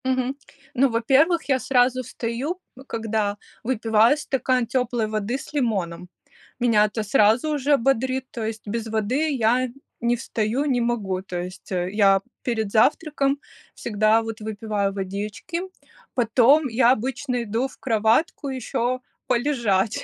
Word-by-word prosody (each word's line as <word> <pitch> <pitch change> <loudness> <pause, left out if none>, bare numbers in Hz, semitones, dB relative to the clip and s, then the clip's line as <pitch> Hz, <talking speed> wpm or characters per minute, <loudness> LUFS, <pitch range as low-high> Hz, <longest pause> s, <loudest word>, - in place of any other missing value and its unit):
Мгм. 260 0 0 0.4
Ну, 270 +1 +3
во-первых, 275 +9 +3
я 265 -1 +3
сразу 255 0 +2
встаю 250 +8 -4 0.3
когда, 220 -2 -1 0.3
выпиваю 225 +1 +3
стакан 255 -4 0
теплой 245 -2 0
воды 215 +3 -2
с 275 - -11
лимоном. 190 - -1 0.5
Меня 230 -4 +4
это 215 +1 -3
сразу 220 +5 +3
уже 285 0 +2
бодрит, 260 +1 0
то 230 - -5
есть 220 0 -5
без 225 +2 -3
воды 225 +8 0
я 245 +2 +2 0.3
не 235 +1 +1
встаю, 235 +3 -1
не 255 -4 +1
могу. 210 -6 -1
То 180 -2 -5
есть 180 +1 -9
я 195 +2 +3 0.2
перед 220 -4 -1
завтраком 275 +4 +2 0.4
всегда 215 0 +2
вот 225 0 -6
выпиваю 210 -2 -2
водички, 200 - -4 0.5
потом 255 +5 +4
я 240 0 +4
обычно 255 0 -1
иду 230 +4 -1
в 270 - -17
кроватку 230 +6 +1
еще 255 -1 -2 0.3
полежать. 235 -6 +1
235 Hz, 130 wpm, -23 LUFS, 215-260 Hz, 0.5 s, Меня